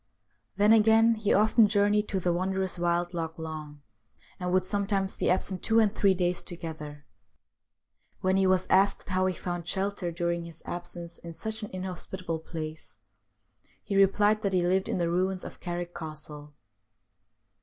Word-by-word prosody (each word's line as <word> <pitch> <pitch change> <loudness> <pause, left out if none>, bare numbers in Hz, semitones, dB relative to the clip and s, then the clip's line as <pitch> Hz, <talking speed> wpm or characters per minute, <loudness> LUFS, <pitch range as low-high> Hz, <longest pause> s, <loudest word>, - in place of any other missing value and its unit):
Then 210 +2 +6
again 225 +1 +5
he 215 -2 -1
often 215 +1 +5
journeyed 205 0 +2
to 195 - -1
the 175 -1 +1
wondrous 190 +1 -1
wild 175 +1 0
Loch 165 -1 -4
Long, 155 -2 -7 0.6
and 180 -1 -2
would 185 0 +2
sometimes 195 0 0
be - - 0
absent 185 0 0
two 225 - +2
and 215 -2 +4
three 195 -3 +3
days 180 -1 0
together. 155 -4 -7 1.2
When 185 0 +2
he 190 0 +3
was 185 0 +3
asked 195 +2 +3
how 185 0 +2
he 185 - -1
found 175 -1 -5
shelter 190 -1 -2
during 170 0 -2
his 165 -1 -12
absence 175 -1 -6
in 170 -1 -9
such 220 +6 -5
an 210 - -5
inhospitable 185 -2 -4
place, 160 -1 -7 0.9
he 200 - -3
replied 205 +2 +4
that 200 -3 -1
he 180 -1 +2
lived 190 +2 +1
in - - 0
the 170 -1 0
ruins 185 +2 0
of - - -9
Carrick 175 -1 -4
Castle. 150 -2 -8
185 Hz, 165 wpm, -28 LUFS, 170-195 Hz, 1.2 s, Then